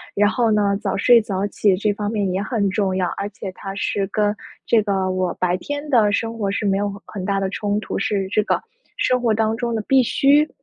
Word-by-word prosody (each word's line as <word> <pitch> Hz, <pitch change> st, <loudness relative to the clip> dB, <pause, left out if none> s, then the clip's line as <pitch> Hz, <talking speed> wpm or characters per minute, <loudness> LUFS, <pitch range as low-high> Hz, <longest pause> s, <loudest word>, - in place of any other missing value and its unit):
然 205 Hz, +1 st, +4 dB
后 230 Hz, -1 st, +1 dB
呢， 205 Hz, -1 st, +2 dB
早 -, -, -1 dB
睡 235 Hz, +3 st, +6 dB
早 200 Hz, -2 st, -2 dB
起 205 Hz, 0 st, +2 dB
这 205 Hz, +1 st, +1 dB
方 205 Hz, +1 st, -3 dB
面 205 Hz, -3 st, -1 dB
也 190 Hz, -, -1 dB
很 215 Hz, -5 st, 0 dB
重 190 Hz, -1 st, 0 dB
要， 185 Hz, -1 st, +1 dB
而 200 Hz, -, -4 dB
且 195 Hz, -1 st, -7 dB
它 195 Hz, +1 st, -7 dB
是 200 Hz, -1 st, -1 dB
跟 210 Hz, +1 st, 0 dB, 0.3 s
这 225 Hz, -2 st, +4 dB
个 195 Hz, -2 st, 0 dB
我 185 Hz, -1 st, -1 dB
白 180 Hz, 0 st, 0 dB
天 290 Hz, +8 st, -5 dB
的 220 Hz, -6 st, +4 dB
生 230 Hz, +2 st, -2 dB
活 200 Hz, -3 st, -1 dB
是 210 Hz, +1 st, -2 dB
没 195 Hz, -1 st, +2 dB
有 205 Hz, 0 st, -1 dB
很 195 Hz, -3 st, -7 dB
大 195 Hz, +1 st, 0 dB
的 195 Hz, -, -1 dB
冲 205 Hz, 0 st, -1 dB
突， -, -, -4 dB
是 205 Hz, -6 st, -1 dB
这 210 Hz, +2 st, +2 dB
个 -, -, 0 dB, 0.4 s
生 250 Hz, -1 st, +1 dB
活 230 Hz, -3 st, +2 dB
当 220 Hz, +1 st, +1 dB
中 235 Hz, 0 st, -2 dB
的 220 Hz, -, -1 dB
必 270 Hz, -1 st, +5 dB
需。 285 Hz, +5 st, +3 dB
205 Hz, 255 characters per minute, -21 LUFS, 195-225 Hz, 0.4 s, 睡